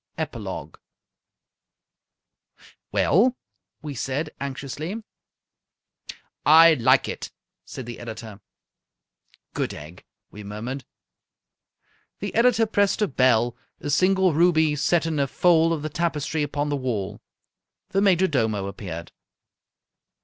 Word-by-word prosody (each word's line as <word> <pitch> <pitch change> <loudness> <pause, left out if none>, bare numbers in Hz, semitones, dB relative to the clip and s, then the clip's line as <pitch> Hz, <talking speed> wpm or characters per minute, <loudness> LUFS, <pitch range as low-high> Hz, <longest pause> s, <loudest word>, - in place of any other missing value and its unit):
EPILOGUE - - -5 2.1
"Well?" 255 0 +3 0.5
we 150 -2 -5
said, 140 +4 -3
anxiously. 140 - -5 1.4
"I 165 +2 +8
like 120 -6 +3
it," - - -5 0.4
said 130 - -8
the 120 -1 -8
editor. 110 -3 -8 1.1
"Good - - -2
egg!" 75 +4 -11 0.3
we 105 - -10
murmured. 115 +6 -6 1.3
The - - -5
editor 230 -1 +4
pressed 205 0 +1
a - - +2
bell, 120 -4 +2 0.2
a 145 - -4
single 185 +2 +3
ruby 160 -2 +3
set 160 +3 +1
in 160 -2 -1
a 140 - +2
fold 165 +2 +3
of 155 -3 -2
the - - -1
tapestry 155 -1 -1
upon 145 0 -2
the 145 - 0
wall. 105 -6 -3 0.7
The 195 - +1
major 190 -2 +4
domo 110 - 0
appeared. 90 -4 -7
145 Hz, 110 wpm, -24 LUFS, 120-170 Hz, 2.1 s, I